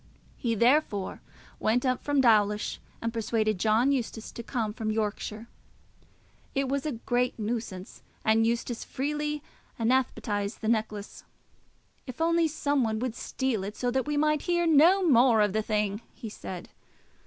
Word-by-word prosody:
He 230 -2 -1
therefore 235 -4 +2 0.4
went 245 +4 +1
up 255 -1 0
from 285 -2 +2
Dawlish 210 -3 +3 0.2
and 230 0 -1
persuaded 220 -3 0
John 225 +6 +3
Eustace 235 -4 -3
to - - -7
come 225 -3 -2
from 220 0 -3
Yorkshire. 215 0 -2 1.1
It 275 0 +1
was 275 +2 -1
a 300 - -1
great 245 +2 -1
nuisance, 215 -4 -4 0.2
and 220 +1 +4
Eustace 235 0 -2
freely 295 +2 -3 0.3
anathematised 225 -4 0
the 220 - -3
necklace. 215 -2 -2 0.8
"If 255 +2 -8
only 335 0 +3
some 285 -3 0
one 220 -1 0
would 245 +1 -2
steal 240 -3 -2
it, 205 +2 -5
so 245 -1 -1
that 265 +2 0
we 295 0 0
might 305 0 +2
hear 345 0 +2
no 340 +4 +5
more 245 -4 +5
of 205 -2 +3
the 220 - +1
thing!" 210 -1 -1
he 230 - -7
said. 185 -3 -8
235 Hz, 155 wpm, -28 LUFS, 215-275 Hz, 1.1 s, no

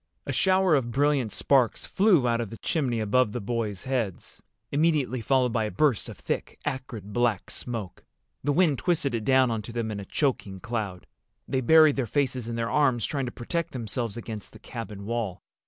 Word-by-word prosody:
A - - -2
shower 190 -2 +3
of 130 -5 +2
brilliant 135 -3 +1
sparks 130 +2 +2
flew 185 - +3
out 120 0 +1
of 115 - -4
the 115 - -8
chimney 130 -8 -1
above 110 +1 +2
the 120 - -2
boys' 105 -3 -3
heads, 120 -9 -3 0.3
immediately 145 -5 +1
followed 125 0 +2
by 110 -2 +1
a - - -2
burst 145 -3 +1
of - - -9
thick - - -4
acrid 130 -7 -5
black 120 -5 0
smoke. 115 -7 -5 0.4
The 145 - +1
wind 155 -3 +3
twisted 160 -7 0
it 115 -2 -1
down 130 0 +4
onto 115 +1 -4
them 115 -2 -2
in 105 - -4
a 100 - -7
choking 105 -7 -1
cloud. 105 -5 -4 0.4
They 130 - 0
buried 155 +2 +6
their 130 -3 0
faces 130 -1 0
in 115 - -3
their 115 0 -2
arms, 130 -6 +3
trying 140 -3 -2
to - - -4
protect 165 +8 -3
themselves 115 -2 -3
against 110 -3 -7
the - - -11
cabin 105 -4 -7
wall. 110 -5 -3
120 Hz, 190 wpm, -27 LUFS, 110-140 Hz, 0.4 s, buried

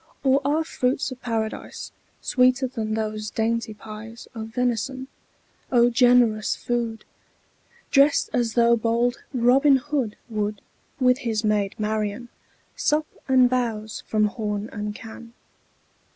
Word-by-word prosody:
Or 270 0 +4
are 300 +4 +1
fruits 260 -3 -1
of 255 - -9
Paradise 225 -2 -4 0.3
Sweeter 255 0 +3
than 225 -4 -3
those 215 -1 -3
dainty 225 0 -1
pies 220 +2 -10
Of 220 -2 -6
venison? 250 +3 -2 0.6
O 240 -1 +5
generous 240 -3 +4
food! 235 -2 -3 0.9
Drest 280 +1 +4
as 235 -2 0
though 235 0 +5
bold 235 +2 +1
Robin 270 +3 +4
Hood 265 -5 -2
10 225 -3 -8
Would, 210 0 -2 0.4
with 250 0 +4
his 225 -4 -1
maid 210 -2 +1
Marian, 215 +2 -2 0.5
Sup 305 +1 +1 0.2
and 260 -2 +5
bowse 230 -4 -2
from 215 -1 +2
horn 210 0 -3
and 210 -1 -4
can. 230 +1 -11
235 Hz, 125 wpm, -24 LUFS, 215-255 Hz, 0.9 s, O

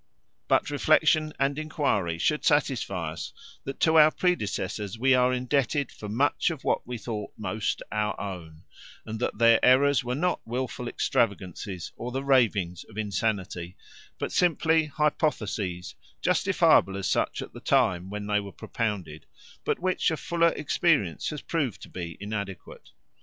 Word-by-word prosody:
But - - +2
reflection 155 -1 +3
and 140 +2 +1
enquiry 140 - -1
should 150 - 0
satisfy 115 - +1
us 80 - -7 0.3
that 135 - -6
to 160 -1 +5
our 155 0 +8
predecessors 110 - -2
we 130 +3 +3
are 125 0 +4
indebted 130 +1 0
for 105 - -9
much 140 +10 +1
of 160 -5 -6
what - - 0
we 125 -1 -4
thought 110 -2 -5
most 105 +1 -2
our 105 0 -1
own, 85 -6 -7 0.4
and 110 0 -5
that 125 - -2
their 115 0 +5
errors 135 +1 +5
were 125 +1 -2
not 180 +5 0
wilful 125 +1 -4
extravagances 95 -6 -2
or 120 +1 -5
the 135 +2 -3
ravings 105 - +2
of 110 - -15
insanity, 100 -4 -2 0.4
but - - -3
simply 160 -2 +3
hypotheses, 115 - -1 0.3
justifiable 95 +2 +3
as 95 - -2
such - - 0
at - - -12
the - - -9
time 100 -10 +2
when 105 0 -5
they 105 0 +1
were 100 -1 -7
propounded, 95 -12 -4 0.4
but - - 0
which 185 0 +1
a 160 - -2
fuller 170 +1 +2
experience 135 - +1
has 150 - -6
proved 145 -9 -2
to - - -11
be 85 -3 -6
inadequate. 100 -2 -6
115 Hz, 150 wpm, -27 LUFS, 100-140 Hz, 0.4 s, our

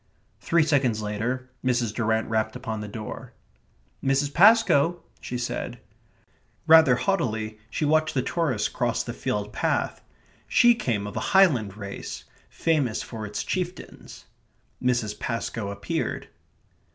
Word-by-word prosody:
Three 165 -1 +2
seconds 135 -8 +1
later 115 +5 -3 0.2
Mrs. 120 -4 +1
Durrant 110 -1 0
rapped 110 -1 -1
upon 110 -1 -4
the 105 - -6
door. 105 +1 -8 0.7
"Mrs. 140 +1 +1
Pascoe?" 175 -5 +5 0.2
she 125 - -5
said. 120 0 -4 0.9
Rather 160 -5 +7
haughtily, 110 - -1
she 150 - -2
watched 155 +1 +2
the 130 - +1
tourists 150 -11 0
cross - - -1
the - - -6
field 105 0 -3
path. - - -1 0.5
She 240 0 +6
came 115 - -2
of 105 - -7
a - - -1 0.2
Highland 120 - +4
race, 100 -2 -7 0.3
famous 145 -9 0
for 110 -3 -6
its 105 - -4
chieftains. 180 -1 -5 0.6
Mrs. 120 -4 0
Pascoe 115 -3 -3
appeared. 100 - -3
125 Hz, 125 wpm, -25 LUFS, 110-155 Hz, 0.9 s, Rather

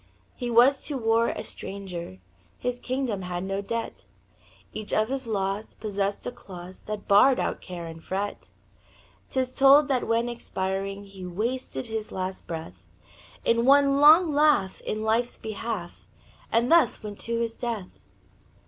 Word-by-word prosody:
He 245 -2 -4
was 245 +4 +5
to 290 - -2
war 230 -1 +2
a - - -4
stranger; 180 - -6 0.4
His 250 0 -3
kingdom 255 -6 -2
had 180 0 -4
no 195 +1 -2
debt; 230 +3 -4 0.7
Each 215 -1 -6
of 215 +1 +2
his 270 -2 -3
laws 200 0 -2
possessed 200 -2 -2
a - - -2
clause 185 -4 -10
That 210 -1 -5
barred 250 +6 +6
out - - -2
care 175 -2 -7
and 165 0 -9
fret 200 +2 -4 0.8
'Tis 255 -1 -1
told 280 +2 +6
that 260 -3 +1
when 230 +1 +1
expiring 195 -4 -3
He 195 -2 -11
wasted 230 +9 -3
his 220 -2 -4
last 185 0 -4
breath 160 - -7 0.6
In 230 0 +3
one 275 +1 +5
long 310 +2 +7
laugh 290 -10 +3
in 215 0 -3
life's 230 +2 +1
behalf, 215 -4 -5 0.4
And 235 +4 +2
thus 330 -11 +4
went 205 -1 -7
to 230 0 -2
his 230 -1 -1
death. 225 -6 -5
220 Hz, 150 wpm, -26 LUFS, 195-250 Hz, 0.8 s, long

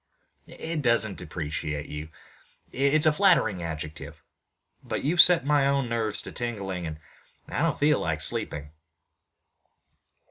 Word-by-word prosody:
"It 160 -1 -5
doesn't 115 -5 +1
depreciate 75 -2 -4
you. 75 +2 -7 0.6
It's 140 +3 +2
a 155 - +6
flattering 150 - +3
adjective, 75 -2 -6 0.7
but - - -4
you've 165 +6 +6
set 175 -5 +5
my 145 -1 +3
own 140 -3 +1
nerves 115 -3 -1
to - - -8
tingling 95 -7 -4
and 80 -1 -6 0.5
I - - -3
don't 165 -2 +1
feel 150 0 +3
like 80 -1 -2
sleeping." 75 -1 -2
115 Hz, 130 wpm, -26 LUFS, -, 0.7 s, a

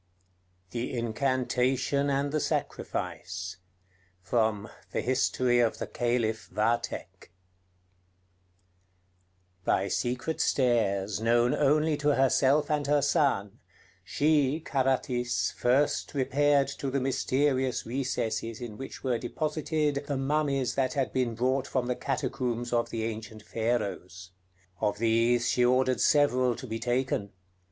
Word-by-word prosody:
THE 120 +2 -3
INCANTATION 130 +3 0
AND 140 +1 0
THE 155 - 0
SACRIFICE 95 -8 -3 0.7
From 110 +1 0 0.2
'The - - -2
History 125 -1 +1
of 115 -2 +2
the - - -3
Caliph 120 -2 -1
Vathek' 115 -1 -2 2.3
By - - +1
secret 125 +6 -1
stairs, 105 -6 +1
known 120 +2 +3
only 150 +1 +2
to 145 0 +2
herself 135 +3 +3
and 150 -1 0
her 145 -1 +3
son, 140 - +1 0.4
she 150 -1 +2
[Carathis] 130 -4 0
first 135 +4 +1
repaired 140 +1 +2
to 140 - -2
the 140 +1 0
mysterious 130 0 0
recesses 115 -3 -2
in 115 -4 -7
which 135 - -8
were 125 -3 0
deposited 150 +1 -1
the 140 - -1
mummies 135 -2 0
that 130 -2 0
had 130 -7 -1
been 125 -3 0
brought 130 +3 0
from 130 -2 -1
the 125 0 -1
catacombs 125 -3 -2
of 120 -1 +1
the 115 -1 -3
ancient 110 -1 -6
Pharaohs. 100 -6 -3 0.5
Of 105 -1 0
these 115 +2 +2
she 125 - +2
ordered 130 +1 +2
several 130 -4 +3
to 130 - -8
be 115 -2 -4
taken. 120 -4 -1
125 Hz, 120 wpm, -28 LUFS, 115-140 Hz, 2.3 s, known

